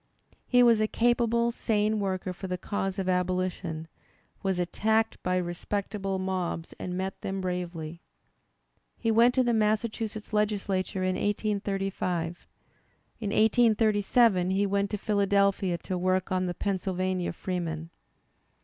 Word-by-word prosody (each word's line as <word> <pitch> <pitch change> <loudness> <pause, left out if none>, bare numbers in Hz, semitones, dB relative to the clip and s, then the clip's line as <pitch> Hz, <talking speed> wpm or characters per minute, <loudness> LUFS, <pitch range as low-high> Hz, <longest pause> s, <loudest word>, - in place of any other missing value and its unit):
He 245 -1 +5
was 230 -2 +5
a 215 - +3
capable, 235 0 +2
sane 215 -2 0
worker 185 -2 -2
for 190 +2 -7
the 180 0 -2
cause 195 0 -3
of 190 -1 -2
Abolition, 180 -3 -1 0.5
was 190 -2 0
attacked 220 +5 +1
by 180 0 0
respectable 195 +3 -2
mobs 185 -3 -3
and 180 0 -4
met 190 +1 -4
them 195 0 -3
bravely. 175 -3 -4 1.0
He 225 - 0
went 235 +3 +5
to 260 - +4
the 240 -1 +1
Massachusetts 215 0 -1
Legislature 200 -3 0
in 185 0 +1
1835. 195 -4 -2 0.7
In 215 -3 -3
1837 215 -3 +3
he 195 +2 +2
went 200 0 0
to 210 - -2
Philadelphia 200 -3 +2
to 180 +2 -4
work 185 +1 0
on 185 0 +1
The 175 - -3
Pennsylvania 185 -2 -1
Freeman. 165 -2 -4
195 Hz, 130 wpm, -28 LUFS, 180-215 Hz, 1.0 s, He